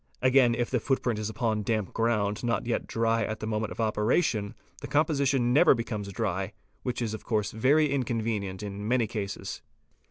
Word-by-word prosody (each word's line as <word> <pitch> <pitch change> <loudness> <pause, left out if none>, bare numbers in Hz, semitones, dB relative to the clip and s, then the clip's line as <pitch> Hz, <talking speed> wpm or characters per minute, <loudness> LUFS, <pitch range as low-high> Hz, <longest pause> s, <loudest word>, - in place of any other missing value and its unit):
Again 130 -2 +4
if 120 0 -2
the 125 - +2
footprint 120 -3 0
is 110 0 -2
upon 110 -1 -1
damp 105 -1 -1
ground 110 -2 0
not 120 0 0
yet 120 - -1
dry 115 0 +1
at 110 - -3
the - - -4
moment 110 0 -2
of - - -8
operation, 110 0 +1 0.3
the - - -5
composition 140 -5 +2
never 155 +1 +6
becomes 110 -4 -4
dry, 95 -2 -2 0.3
which 125 -1 -2
is 110 -2 -2
of 110 - -6
course 105 -3 0
very 140 +7 +3
inconvenient 110 -7 -2
in 100 0 -5
many 120 0 +2
cases. 100 -2 -5
115 Hz, 180 wpm, -28 LUFS, 105-125 Hz, 0.3 s, never